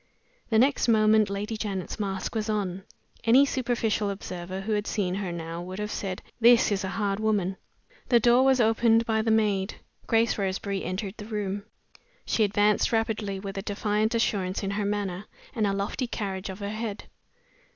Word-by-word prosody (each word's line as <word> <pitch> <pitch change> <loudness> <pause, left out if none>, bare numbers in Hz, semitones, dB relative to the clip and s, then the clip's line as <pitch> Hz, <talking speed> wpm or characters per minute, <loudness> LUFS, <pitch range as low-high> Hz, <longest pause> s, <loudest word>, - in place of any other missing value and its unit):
The 220 - +3
next 265 +3 +3
moment 215 -2 +4
Lady 205 +3 -3
Janet's 200 -2 -4
mask 195 -2 -3
was 220 -1 -2
on. 195 -3 -1 0.4
Any 255 +5 +6
superficial 235 -6 0
observer 185 -1 -5
who 215 +3 -4
had 210 0 0
seen 185 -4 -1
her 190 -2 -3
now 165 0 -5
would 185 +1 -7
have 210 0 -3
said, 190 -2 -4 0.2
"This 235 -1 +6
is 200 -1 0
a - - -2
hard 200 -2 0
woman!" 205 -4 0 0.5
The 240 - +6
door 240 +3 +5
was 265 -1 +4
opened 225 0 +4
by 220 -1 +1
the 225 - -1
maid. 210 -3 +1 0.3
Grace 225 -1 +2
Roseberry 195 0 -2
entered 190 +2 -3
the 210 - -8
room. 205 -2 -3 0.6
She 220 - +2
advanced 210 +1 +2
rapidly, 225 -3 -1
with 195 0 -5
a - - -3
defiant 210 +2 0
assurance 200 -4 0
in 195 - -1
her 205 +1 -1
manner, 200 -2 -2 0.3
and 220 -5 +1
a - - +1
lofty 200 +6 -2
carriage 195 -4 -4
of 190 +2 -7
her 200 - -3
head. 215 -1 -4
210 Hz, 180 wpm, -27 LUFS, 195-225 Hz, 0.6 s, Any